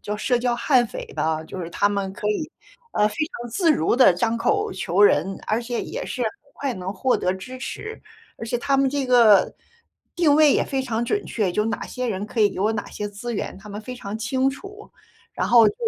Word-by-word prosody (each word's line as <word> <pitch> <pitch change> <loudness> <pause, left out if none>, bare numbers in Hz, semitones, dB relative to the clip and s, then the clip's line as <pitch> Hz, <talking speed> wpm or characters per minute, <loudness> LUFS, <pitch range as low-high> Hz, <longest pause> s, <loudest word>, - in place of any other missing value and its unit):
叫 210 0 -3
社 245 +3 +1
交 240 0 0
悍 250 -1 +3
匪 - - -7
吧， 160 +1 -1
就 185 - -7
是 170 - -5
他 205 - +2
们 200 -1 -2
可 210 - -5
以， 255 +9 -2 0.4
呃， 210 - +3
非 - - -9 0.3
常 240 - -8
自 330 - +3
如 165 - +1
地 255 -8 +7
张 225 +6 0
口 410 - 0
求 180 - -1
人， 190 -1 +3
而 225 +3 0
且 235 0 -3
也 - - -5
是 250 - -4
很 225 - +2 0.3
快 275 -3 -3
能 185 +1 -5
获 250 +7 +1
得 180 - 0
支 220 +8 -8
持。 440 +11 -7 0.4
而 - - -5
且 245 +1 -1
他 275 +3 +1
们 270 -1 +2
这 280 -2 -1
个 235 -5 +5 0.6
定 320 -5 +4
位 300 -2 +6
也 - - +2
非 270 -2 -2
常 235 -2 -2
准 410 +10 -1
确， 205 -6 -1
就 210 - +1
有 225 - -1
哪 225 - -3
些 250 -1 -4
人 205 -1 -3
可 225 - -3
以 205 - +5
给 - - -8
我 215 +3 +2
哪 210 - -4
些 210 - -4
资 205 +4 -6
源， - - -4
他 210 +2 -13
们 205 +1 -6
非 250 +3 -7
常 210 -4 -6
清 260 +3 +1
楚， 395 +10 -11 0.4
然 - - -1
后 235 -2 +7
就 - - -4
230 Hz, 255 characters per minute, -23 LUFS, 205-260 Hz, 0.6 s, 地